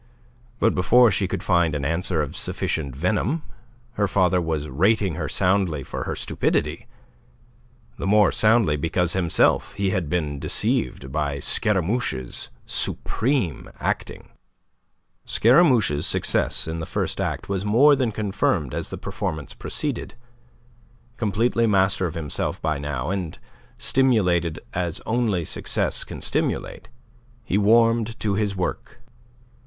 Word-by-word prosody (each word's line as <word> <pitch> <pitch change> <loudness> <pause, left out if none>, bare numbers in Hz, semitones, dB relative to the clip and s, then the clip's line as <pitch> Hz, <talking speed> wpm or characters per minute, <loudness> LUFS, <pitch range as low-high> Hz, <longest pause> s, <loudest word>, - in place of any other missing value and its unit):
But 115 - +2
before 120 +6 +5
she 95 -1 0
could 95 -1 -4
find 85 -4 +2
an 70 -2 -3
answer 85 0 0
of 75 - -7
sufficient 70 -5 -1
venom, 110 - 0 0.5
her 105 -3 0
father 90 -2 +2
was 80 -3 -2
rating 95 +7 +1
her 80 -2 -4
soundly 90 -6 +1
for - - -5
her - - -3
stupidity - - -1 1.1
the - - -3
more 105 0 +5
soundly 110 -8 +3
because 85 +3 0
himself 90 -4 +2
he 100 -1 0
had 90 -6 -2
been 75 -4 -2
deceived 65 - 0
by 70 -1 -1
Scaramouche's 95 - -1 0.2
supreme 110 - -1
acting. - - -3 1.0
Scaramouche's 115 - +4
success - - 0
in 80 +1 -4
the 80 - -5
first - - -2
act - - -3
was 100 -1 -2
more 125 +8 +5
than 130 -4 0
confirmed 100 - -1
as - - -3
the - - -5
performance 75 -2 -5
proceeded. - - -4 1.0
Completely 115 +2 +1
master 95 -2 +2
of 85 - -7
himself 75 -4 -1
by 80 -2 -1
now, 70 +2 -3
and 90 -5 -4 0.4
stimulated 90 -11 +1
as 90 -1 -2
only 110 -7 0
success - - -1
can - - -9
stimulate, - - -2 0.5
he 100 - 0
warmed 115 +1 +3
to 105 -2 0
his 100 -1 -1
work. 90 - -4
95 Hz, 130 wpm, -23 LUFS, 80-110 Hz, 1.1 s, before